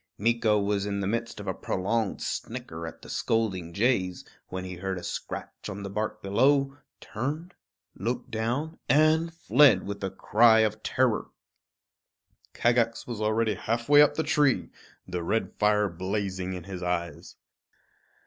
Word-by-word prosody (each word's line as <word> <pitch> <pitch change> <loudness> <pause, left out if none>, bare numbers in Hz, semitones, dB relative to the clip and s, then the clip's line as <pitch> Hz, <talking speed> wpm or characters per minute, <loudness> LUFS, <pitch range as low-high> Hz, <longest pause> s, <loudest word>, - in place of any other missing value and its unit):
Meeko 115 0 +2
was 100 0 0
in 100 0 -2
the 100 - -2
midst 115 +2 -2
of 100 - -7
a 95 - -1
prolonged 100 +4 -2
snicker 80 +1 -5
at 80 - -10
the - - -10
scolding 95 -7 -1
jays, 95 -3 0 0.2
when 95 0 -5
he 90 -1 -6
heard 95 +1 -3
a 90 - -7
scratch - - -6
on 100 0 -6
the 100 - -6
bark 105 +2 -3
below, 135 +7 +3 0.2
turned, 150 - -4 0.4
looked 120 +3 -4
down, 125 +9 -2
and 155 +4 +4
fled 140 - +4
with 100 0 -6
a 95 - 0
cry 110 +4 +4
of 110 0 0
terror. 125 -2 +1 1.3
Kagax 120 -1 +1
was 115 -3 -5
already 110 +1 +1
halfway 115 +8 +3
up 150 - +4
the 160 - 0
tree, 135 - +2 0.4
the 90 -1 -3
red 110 +7 -1
fire 105 0 +3
blazing 95 +1 -3
in 90 -2 -6
his 95 0 -7
eyes. 85 -3 -3
105 Hz, 150 wpm, -27 LUFS, 95-120 Hz, 1.3 s, and